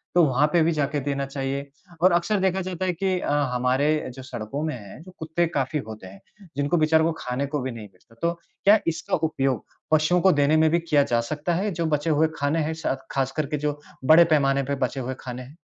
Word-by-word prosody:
तो 175 Hz, -, +6 dB
वहाँ 140 Hz, +1 st, +2 dB
पे 170 Hz, -, +5 dB
भी 165 Hz, -, +2 dB
जाके 145 Hz, -1 st, -1 dB
देना 140 Hz, 0 st, -2 dB
चाहिए? 135 Hz, 0 st, -4 dB, 0.3 s
और 185 Hz, +2 st, +6 dB
अक्सर 185 Hz, +4 st, +1 dB
देखा 190 Hz, 0 st, +1 dB
जाता 185 Hz, 0 st, -3 dB
है 180 Hz, -, 0 dB
कि 185 Hz, +1 st, -1 dB
अ, -, -, -2 dB, 0.2 s
हमारे 130 Hz, +5 st, +1 dB
जो 130 Hz, -, -9 dB
सड़कों 130 Hz, +3 st, -5 dB
में 155 Hz, -3 st, -2 dB
हैं, 105 Hz, +3 st, -11 dB
जो 185 Hz, -, -13 dB
कुत्ते 160 Hz, +2 st, 0 dB
काफ़ी 145 Hz, -1 st, -1 dB
होते 110 Hz, -3 st, -9 dB
हैं, 95 Hz, +1 st, -13 dB, 0.4 s
जिनको 145 Hz, +4 st, +1 dB
बेचारों 160 Hz, 0 st, +3 dB
को 165 Hz, -, +2 dB
खाने 125 Hz, +3 st, -2 dB
को 145 Hz, +1 st, -2 dB
भी 130 Hz, -, -3 dB
नहीं 115 Hz, -3 st, -8 dB
मिलता, 100 Hz, +5 st, -25 dB
तो 170 Hz, 0 st, +1 dB, 0.3 s
क्या 210 Hz, +2 st, +7 dB
इसका 165 Hz, -, -1 dB
उपयोग 135 Hz, -6 st, -1 dB, 0.3 s
पशुओं 155 Hz, +3 st, +3 dB
को 190 Hz, -, +5 dB
देने 145 Hz, +1 st, +3 dB
में 160 Hz, 0 st, +4 dB
भी 170 Hz, -, +3 dB
किया 155 Hz, -4 st, +2 dB
जा 120 Hz, -3 st, +1 dB
सकता 150 Hz, +7 st, -2 dB
है, 200 Hz, +4 st, -1 dB
जो 170 Hz, -1 st, -2 dB
बचे 150 Hz, +1 st, 0 dB
हुए 155 Hz, +1 st, +3 dB
खाने 145 Hz, +3 st, 0 dB
हैं 160 Hz, +2 st, -2 dB
स -, -, +1 dB, 0.2 s
खासकर 135 Hz, +3 st, -1 dB
के 150 Hz, +1 st, -2 dB
जो 150 Hz, 0 st, -2 dB, 0.3 s
बड़े 160 Hz, +5 st, +8 dB
पैमाने 140 Hz, -4 st, +2 dB
पे 140 Hz, +1 st, -2 dB
बचे 135 Hz, +2 st, -5 dB
हुए 130 Hz, +1 st, -4 dB
खाने 125 Hz, -1 st, -7 dB
हैं? 135 Hz, +5 st, -14 dB
150 Hz, 235 wpm, -24 LUFS, 135-165 Hz, 0.4 s, बड़े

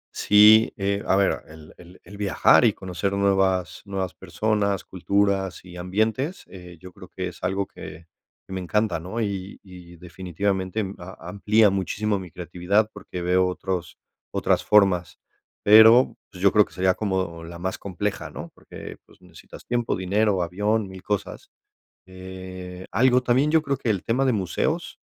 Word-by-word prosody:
Sí, 105 Hz, +2 st, +6 dB
eh, 100 Hz, 0 st, -1 dB
a -, -, +3 dB
ver, 100 Hz, 0 st, +1 dB
el 80 Hz, 0 st, -14 dB
el 90 Hz, +1 st, -16 dB
el 100 Hz, +3 st, -12 dB
viajar 100 Hz, -2 st, +4 dB
y -, -, +4 dB
conocer 95 Hz, +2 st, -4 dB
nuevas 95 Hz, -3 st, +1 dB
nuevas 95 Hz, -2 st, -4 dB
personas, 105 Hz, -3 st, -1 dB
culturas 95 Hz, 0 st, -1 dB
y 90 Hz, -1 st, -12 dB
ambientes, 110 Hz, -, -2 dB
eh, 90 Hz, -2 st, -12 dB
yo 90 Hz, +1 st, -12 dB
creo 95 Hz, -2 st, -13 dB
que 90 Hz, +1 st, -5 dB
es -, -, -15 dB
algo 95 Hz, +2 st, -1 dB
que 85 Hz, -, -11 dB, 0.4 s
que 95 Hz, -, -10 dB
me 95 Hz, -, -3 dB
encanta, 95 Hz, -1 st, 0 dB
¿no?, 95 Hz, +8 st, -5 dB
y 100 Hz, -2 st, -4 dB
y 90 Hz, -2 st, -13 dB
definitivamente 95 Hz, +3 st, -3 dB
m 95 Hz, -1 st, -5 dB
a 90 Hz, -1 st, -10 dB
amplía 105 Hz, +2 st, +3 dB
muchísimo 100 Hz, +2 st, -1 dB
mi 90 Hz, -2 st, -9 dB
creatividad, 90 Hz, +6 st, -1 dB
porque 90 Hz, -, -7 dB
veo 90 Hz, +1 st, +2 dB
otros 90 Hz, -1 st, -4 dB, 0.3 s
otras -, -, +1 dB
formas, 95 Hz, -4 st, +3 dB, 0.4 s
pero, 110 Hz, +4 st, +7 dB
pues, 95 Hz, -1 st, -10 dB
yo 100 Hz, -, +6 dB
creo 105 Hz, -1 st, +5 dB
que -, -, -20 dB
sería 95 Hz, 0 st, +2 dB
como 95 Hz, -5 st, -3 dB
la 85 Hz, +1 st, -9 dB
más 95 Hz, +2 st, -4 dB
compleja, 100 Hz, +1 st, -4 dB
¿no?, -, -, -9 dB
porque, -, -, -11 dB
pues, -, -, -22 dB
necesitas 90 Hz, -3 st, -15 dB
tiempo, 120 Hz, -1 st, -1 dB
dinero, 95 Hz, 0 st, +1 dB
avión, 105 Hz, +4 st, -1 dB
mil 95 Hz, -1 st, -10 dB
cosas. 105 Hz, 0 st, -4 dB, 0.6 s
Eh, 95 Hz, 0 st, -9 dB
algo 125 Hz, +1 st, +3 dB
también, 130 Hz, +4 st, +2 dB
yo 160 Hz, -, +5 dB
creo 140 Hz, -2 st, -1 dB
que 115 Hz, -, -2 dB
el 100 Hz, -4 st, -1 dB
tema 125 Hz, +4 st, 0 dB
de 130 Hz, -, +2 dB
museos, 95 Hz, -6 st, -2 dB
95 Hz, 165 wpm, -24 LUFS, 90-105 Hz, 0.6 s, pero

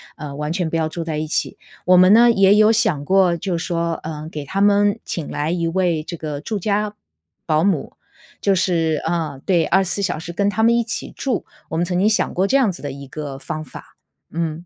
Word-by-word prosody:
呃， 150 Hz, -3 st, -7 dB
完 150 Hz, +2 st, -3 dB
全 175 Hz, -2 st, -1 dB
不 165 Hz, -, -3 dB
要 160 Hz, -1 st, +1 dB
住 165 Hz, +2 st, -5 dB
在 160 Hz, -2 st, -3 dB
一 155 Hz, -, -3 dB
起。 155 Hz, -, -2 dB, 0.3 s
我 180 Hz, 0 st, +6 dB
们 185 Hz, +2 st, +7 dB
呢 235 Hz, +2 st, +7 dB
也 195 Hz, -2 st, +5 dB
有 215 Hz, +1 st, +5 dB
想 175 Hz, -10 st, +1 dB
过， 190 Hz, -1 st, +3 dB
就 175 Hz, 0 st, -2 dB
说， 170 Hz, -1 st, -1 dB
呃， 155 Hz, 0 st, -6 dB
给 150 Hz, -2 st, -6 dB
他 195 Hz, +7 st, -2 dB
们 205 Hz, 0 st, +3 dB
请 165 Hz, -4 st, -4 dB
来 150 Hz, +2 st, -2 dB
一 170 Hz, -1 st, -1 dB
位 170 Hz, -3 st, 0 dB
这 170 Hz, -, -6 dB
个 150 Hz, -2 st, -5 dB
住 210 Hz, +7 st, -4 dB
家 210 Hz, +2 st, -1 dB, 0.5 s
保 155 Hz, 0 st, +2 dB
姆， 185 Hz, -7 st, 0 dB, 0.5 s
就 200 Hz, -, +3 dB
是， 165 Hz, -4 st, +1 dB
呃， 160 Hz, -5 st, -2 dB
对， 175 Hz, -4 st, +2 dB
24 190 Hz, +2 st, +1 dB
小 180 Hz, -5 st, -1 dB
时 170 Hz, +2 st, -7 dB
跟 200 Hz, +3 st, 0 dB
他 220 Hz, -, -1 dB
们 235 Hz, +1 st, +4 dB
一 235 Hz, -, +2 dB
起 230 Hz, -, -5 dB
住， 260 Hz, -5 st, -2 dB, 0.2 s
我 -, -, -4 dB
们 170 Hz, -, +1 dB
曾 180 Hz, 0 st, -2 dB
经 195 Hz, +3 st, +3 dB
想 215 Hz, -, +1 dB
过 185 Hz, -, +2 dB
这 265 Hz, -, +1 dB
样 255 Hz, -7 st, +4 dB
子 175 Hz, -, -11 dB
的 145 Hz, -, -4 dB
一 140 Hz, 0 st, -9 dB
个 140 Hz, -1 st, -6 dB
方 155 Hz, +3 st, -5 dB
法， 150 Hz, -, -13 dB, 0.4 s
嗯。 165 Hz, 0 st, -3 dB
170 Hz, 240 characters per minute, -20 LUFS, 155-195 Hz, 0.5 s, 们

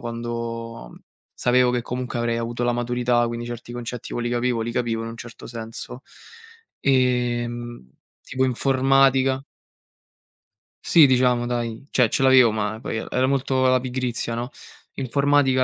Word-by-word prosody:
quando 115 Hz, -, -6 dB, 0.4 s
sapevo 125 Hz, 0 st, +3 dB
che 125 Hz, -, 0 dB
comunque 125 Hz, 0 st, -4 dB
avrei 120 Hz, 0 st, 0 dB
avuto 120 Hz, +1 st, -3 dB
la 120 Hz, -, +2 dB
maturità, 120 Hz, 0 st, +1 dB
quindi 120 Hz, 0 st, -4 dB
certi 120 Hz, 0 st, -7 dB
concetti 120 Hz, -1 st, -6 dB
poi 120 Hz, -, -2 dB
li -, -, 0 dB
capivo 120 Hz, -1 st, 0 dB
li 115 Hz, +1 st, -4 dB
capivo 115 Hz, -2 st, -1 dB
in 115 Hz, -, -5 dB
un 115 Hz, -, -8 dB
certo 115 Hz, 0 st, -10 dB
senso. 115 Hz, +2 st, -8 dB, 0.8 s
Ehm, 120 Hz, -, 0 dB, 0.3 s
tipo 130 Hz, 0 st, -1 dB
informatica 135 Hz, +1 st, +3 dB, 1.4 s
Sì, 160 Hz, -3 st, +7 dB
diciamo 125 Hz, -2 st, +3 dB
dai, 120 Hz, +1 st, -3 dB
cioè 125 Hz, -2 st, +3 dB
ce 135 Hz, -, 0 dB
l'avevo, 130 Hz, -3 st, +6 dB
ma 105 Hz, 0 st, -2 dB
poi -, -, -3 dB
e -, -, -6 dB
era 130 Hz, +1 st, +1 dB
molto 130 Hz, -1 st, +1 dB
la 130 Hz, 0 st, +4 dB
pigrizia, 125 Hz, -2 st, -3 dB
no. 120 Hz, +2 st, -4 dB, 0.4 s
Informatica 135 Hz, 0 st, +2 dB
120 Hz, 145 wpm, -23 LUFS, 115-130 Hz, 1.4 s, Sì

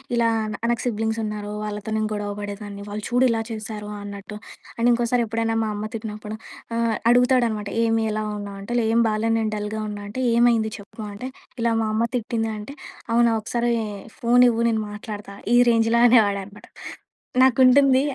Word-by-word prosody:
ఇలా 235 Hz, -1 st, +3 dB
ఆహ్, 215 Hz, +1 st, -3 dB
నాకు 235 Hz, -, -1 dB
సిబ్లింగ్స్ 225 Hz, -1 st, -1 dB
ఉన్నారు. 210 Hz, -1 st, -4 dB
వాళ్ళతో 210 Hz, 0 st, -5 dB
నేను 215 Hz, 0 st, 0 dB
గొడవ 205 Hz, -1 st, -3 dB
పడేదాన్ని, 205 Hz, 0 st, -6 dB
వాళ్ళు 210 Hz, +1 st, -5 dB
చూడు 245 Hz, +1 st, +3 dB
ఇలా 225 Hz, -1 st, +1 dB
చేశారో 215 Hz, -1 st, -6 dB
అన్నట్టు 205 Hz, +1 st, -8 dB, 0.4 s
అండ్ 235 Hz, +1 st, +2 dB
ఇంకోసారి 240 Hz, 0 st, +2 dB
ఎప్పుడైనా 225 Hz, +1 st, -1 dB
మా 220 Hz, -, -1 dB
అమ్మ 210 Hz, +1 st, -4 dB
తిట్టినప్పుడు 215 Hz, -1 st, -6 dB, 0.4 s
ఆహ్, 230 Hz, -1 st, +1 dB, 0.2 s
అడుగుతాడనమాట 245 Hz, -4 st, +2 dB
ఏమి 225 Hz, 0 st, +2 dB
ఎలావున్నావు 210 Hz, -2 st, -4 dB
అంటే 240 Hz, +5 st, -4 dB, 0.2 s
ఏం 230 Hz, +1 st, +4 dB
బాలే 215 Hz, +1 st, 0 dB
నేను 220 Hz, -1 st, -1 dB
డల్‌గా 210 Hz, +1 st, -3 dB
ఉన్నా 205 Hz, 0 st, -6 dB
అంటే, 255 Hz, +5 st, -4 dB
ఏమైంది 235 Hz, -2 st, +3 dB
చెప్పు 205 Hz, +2 st, -11 dB
అంటే, 230 Hz, +6 st, -6 dB, 0.3 s
ఇలా 230 Hz, -1 st, +2 dB
మా 220 Hz, -, 0 dB
అమ్మ 230 Hz, +2 st, +2 dB
తిట్టింది 225 Hz, -1 st, -2 dB
అంటే, 240 Hz, +7 st, -9 dB, 0.4 s
అవునా? 235 Hz, 0 st, +4 dB
ఒకసారి 235 Hz, +2 st, 0 dB, 0.5 s
ఫోన్ 245 Hz, +1 st, +5 dB
ఇవ్వు 230 Hz, 0 st, 0 dB
నేను 220 Hz, -1 st, 0 dB
మాట్లాడుతా 205 Hz, -1 st, -8 dB, 0.2 s
ఈ -, -, +7 dB
రేంజ్‌లో 230 Hz, 0 st, +3 dB
అనేవాడనమాట. 205 Hz, -4 st, +2 dB, 0.7 s
నాకుంటుంది 260 Hz, +1 st, +6 dB
220 Hz, 160 wpm, -23 LUFS, 210-235 Hz, 0.7 s, ఈ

